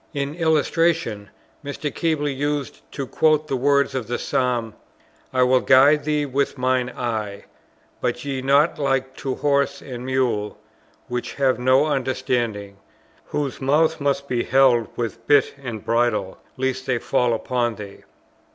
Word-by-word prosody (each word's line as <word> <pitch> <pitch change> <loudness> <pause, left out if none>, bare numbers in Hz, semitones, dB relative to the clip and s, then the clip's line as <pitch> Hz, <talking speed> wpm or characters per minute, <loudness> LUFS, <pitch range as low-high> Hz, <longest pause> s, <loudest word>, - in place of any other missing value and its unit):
In 140 0 -2
illustration, 160 - +1 0.3
Mr. 145 +1 -4
Keble 160 -3 0
used 145 0 -3
to 140 - -4
quote 155 +2 +2
the 135 - -1
words 140 +1 +2
of 130 -4 -3
the 120 - -2
Psalm: 120 -4 -1 0.6
"I 130 -1 +3
will 130 0 +4
guide 140 +4 +5
thee 150 -1 0
with 140 +1 -1
mine 130 -1 +1
eye. 110 -5 -4 0.6
Be - - +2
ye 135 +1 -4
not 140 +5 +3
like 135 -2 0
to 130 -2 -3
horse 140 0 +1
and 125 -3 -8
mule, 125 -5 -1 0.5
which 125 0 -4
have 135 -2 +1
no 130 +3 +4
understanding; 125 -7 -2 0.5
whose 140 -3 -3
mouths 155 +3 +2
must 140 0 0
be 120 -3 0
held 125 -3 +4
with 115 -1 -4
bit 145 -2 +4
and 120 -6 -6
bridle, 115 -5 0 0.2
lest 130 0 -2
they 125 -2 +1
fall 120 -1 +1
upon 120 -1 -1
thee." 100 -2 -10
130 Hz, 145 wpm, -22 LUFS, 120-145 Hz, 0.6 s, guide